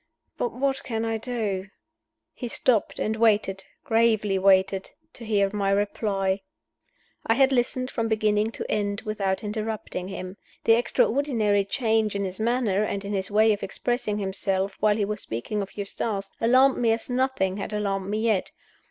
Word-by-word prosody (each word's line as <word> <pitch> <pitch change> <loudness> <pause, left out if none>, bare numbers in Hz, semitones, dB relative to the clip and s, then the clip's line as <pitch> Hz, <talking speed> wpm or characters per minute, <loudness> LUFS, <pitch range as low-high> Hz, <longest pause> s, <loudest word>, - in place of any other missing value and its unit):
But 475 - -1
what 270 0 -1
can 225 -1 -2
I 225 0 -1
do?" 215 -5 -3 0.7
He 245 - -5
stopped, 230 -1 +1
and 220 - -1
waited 205 -4 +2 0.2
gravely 220 -4 +2
waited 190 0 +3 0.2
to 235 - -10
hear 200 -3 +1
my 200 -1 0
reply. 195 -1 0 0.9
I 225 - +4
had 270 +1 +4
listened 255 0 0
from 230 -2 -1
beginning 215 -1 +2
to - - -4
end 205 -1 -1
without 200 -2 -2
interrupting 210 -3 -4
him. 185 0 -7 0.3
The 225 - +5
extraordinary 230 -3 +2
change 220 0 +1
in 200 0 -1
his 185 +1 -6
manner, 225 -3 +1
and 200 -1 -3
in 205 - -3
his 195 -1 -2
way 215 +1 +4
of 205 - -5
expressing 230 0 -2
himself, 195 -1 -1
while 210 0 +3
he 205 - +1
was 210 0 -4
speaking 120 - -3
of 195 +1 -8
Eustace, 200 0 -3
alarmed 255 +4 +5
me 230 -2 +3
as 225 - -4
nothing 250 -7 0
had 205 - -5
alarmed 200 -2 -2
me 215 +1 -1
yet. 220 -4 +1
210 Hz, 165 wpm, -25 LUFS, 195-230 Hz, 0.9 s, The